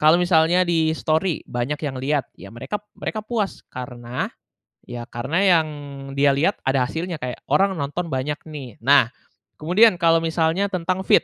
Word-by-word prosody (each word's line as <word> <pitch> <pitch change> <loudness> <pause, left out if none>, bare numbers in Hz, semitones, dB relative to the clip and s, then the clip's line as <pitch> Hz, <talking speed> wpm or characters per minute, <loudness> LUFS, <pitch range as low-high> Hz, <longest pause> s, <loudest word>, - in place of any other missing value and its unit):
kalau 155 +3 +5
misalnya 175 0 +4
di-story 160 +1 +1
banyak 125 +5 -2
yang 135 -3 -3
lihat, 145 +1 0
ya 100 - -11
mereka 130 - -4 0.2
mereka 215 - -3
puas. 215 -4 -3
Karena, 125 -1 -5 0.6
ya 120 -1 -7
karena 135 +8 -3
yang 175 -5 +4 0.5
dia 140 0 +5
lihat, 165 +8 +1
ada 135 -1 +3
hasilnya 165 +5 -4
kayak, 125 -1 -5
orang 190 +8 +3
nonton 150 +5 -3
banyak 140 +3 -1
nih. 135 -8 -8
Nah 135 -3 +5 0.5
kemudian, 185 +7 +5
kalau 165 0 +5
misalnya 165 +4 +1
tentang 185 +1 -1
feed, - - +6
155 Hz, 155 wpm, -22 LUFS, 130-175 Hz, 0.6 s, feed